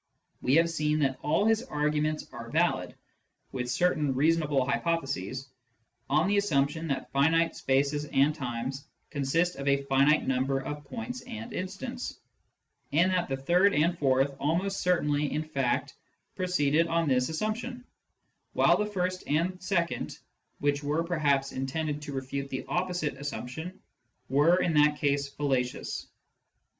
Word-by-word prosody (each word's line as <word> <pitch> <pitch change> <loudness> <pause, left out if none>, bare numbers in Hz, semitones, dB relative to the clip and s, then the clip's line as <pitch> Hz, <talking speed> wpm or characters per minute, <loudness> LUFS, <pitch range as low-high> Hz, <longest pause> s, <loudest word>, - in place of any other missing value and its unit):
We 130 - +3
have 165 +1 +5
seen 150 -1 0
that 135 -2 +1
all 160 +7 +2
his 225 0 +3
arguments 150 +1 -1
are 115 -1 -8
valid - - +1 0.6
(with 125 -1 -3
certain 150 -1 +1
reasonable 150 -2 +2
hypotheses) 135 - -2 0.6
on 155 +6 +3
the 205 +1 +2
assumption 160 -4 +1
that 140 -3 -3
finite 165 +4 +3
spaces 140 +2 +1
and 145 +1 +3
times 130 -1 -4 0.2
consist 165 +5 0
of 140 0 -5
a 140 0 +3
finite 140 +3 +3
number 135 +1 +1
of 145 +2 -6
points 240 - -6
and 230 -1 -7
instants, 240 +7 -5 0.7
and 170 +6 +3
that 180 -3 0
the 135 - -1
third 180 +9 +3
and 165 +4 +3
fourth 135 0 +2
almost 185 +7 0
certainly 150 -5 +1
in 155 +1 -1
fact 140 -5 -1 0.4
proceeded 165 -3 +2
on 165 -1 +1
this 125 -2 +2
assumption, 225 +8 -3 0.7
while - - +5
the 210 - 0
first 185 -2 -2
and 170 +5 0
second, 175 -3 -1 0.4
which 145 0 0
were 150 +3 0
perhaps 145 -5 +1
intended 150 +3 -3
to 150 -1 -6
refute 135 +1 -4
the 130 - -4
opposite 175 -6 -1
assumption, 145 +5 -6 0.5
were 145 +6 +5
in 170 - +1
that 150 0 +4
case 140 -1 0
fallacious. 135 -4 -2
150 Hz, 140 wpm, -29 LUFS, 140-170 Hz, 0.7 s, have